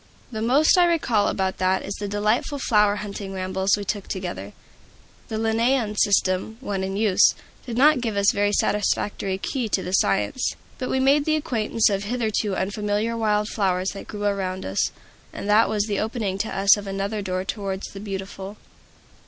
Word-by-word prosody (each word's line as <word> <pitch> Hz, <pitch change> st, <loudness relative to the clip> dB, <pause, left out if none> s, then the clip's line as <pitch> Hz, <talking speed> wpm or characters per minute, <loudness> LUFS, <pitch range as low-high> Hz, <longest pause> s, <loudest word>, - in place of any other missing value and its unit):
The 220 Hz, -2 st, -4 dB
most 280 Hz, +10 st, +4 dB
I 350 Hz, -, +6 dB
recall 265 Hz, -11 st, +2 dB
about 190 Hz, -1 st, -1 dB
that 185 Hz, 0 st, +1 dB
is 200 Hz, -, -4 dB
the 205 Hz, +1 st, -5 dB
delightful 210 Hz, +7 st, 0 dB
flower 210 Hz, -6 st, +3 dB
hunting 200 Hz, -1 st, -6 dB
rambles 190 Hz, +1 st, 0 dB
we 205 Hz, -, -5 dB
took 205 Hz, 0 st, -3 dB
together. 175 Hz, -, -5 dB, 0.7 s
The 220 Hz, -, -4 dB
Linnaean 225 Hz, 0 st, +1 dB
system, 200 Hz, +1 st, +1 dB
then 200 Hz, -7 st, -3 dB
in 195 Hz, +1 st, -3 dB
use, 210 Hz, -3 st, +4 dB, 0.3 s
did 235 Hz, -1 st, -4 dB
not 290 Hz, 0 st, +5 dB
give 225 Hz, -4 st, -2 dB
us 200 Hz, 0 st, +4 dB
a -, -, -11 dB
very 205 Hz, 0 st, +2 dB
satisfactory 205 Hz, -2 st, 0 dB
key 240 Hz, +3 st, -3 dB
to 195 Hz, -, 0 dB
the 180 Hz, -, -5 dB
science. 105 Hz, -, +1 dB, 0.2 s
But 255 Hz, -, -3 dB
we 265 Hz, -, +1 dB
made 280 Hz, +2 st, +3 dB
the 310 Hz, -, +2 dB
acquaintance 225 Hz, -6 st, +1 dB
of 200 Hz, 0 st, -1 dB
hitherto 215 Hz, -3 st, -1 dB
unfamiliar 210 Hz, +3 st, -1 dB
wild 210 Hz, -2 st, +1 dB
flowers 185 Hz, -2 st, 0 dB
that 195 Hz, -, -8 dB
grew 205 Hz, -1 st, -6 dB
around 190 Hz, -2 st, -2 dB
us, 95 Hz, +1 st, 0 dB, 0.4 s
and -, -, -6 dB
that 210 Hz, +2 st, +4 dB
was 210 Hz, -1 st, +1 dB
the 205 Hz, -2 st, -2 dB
opening 215 Hz, -4 st, -2 dB
to 220 Hz, -, -1 dB
us 195 Hz, +2 st, +5 dB
of 205 Hz, -1 st, -7 dB
another 195 Hz, +2 st, -3 dB
door 185 Hz, -1 st, -3 dB
towards 195 Hz, -1 st, -4 dB
the 195 Hz, -, -9 dB
Beautiful. 195 Hz, 0 st, -6 dB
205 Hz, 185 wpm, -23 LUFS, 195-225 Hz, 0.7 s, I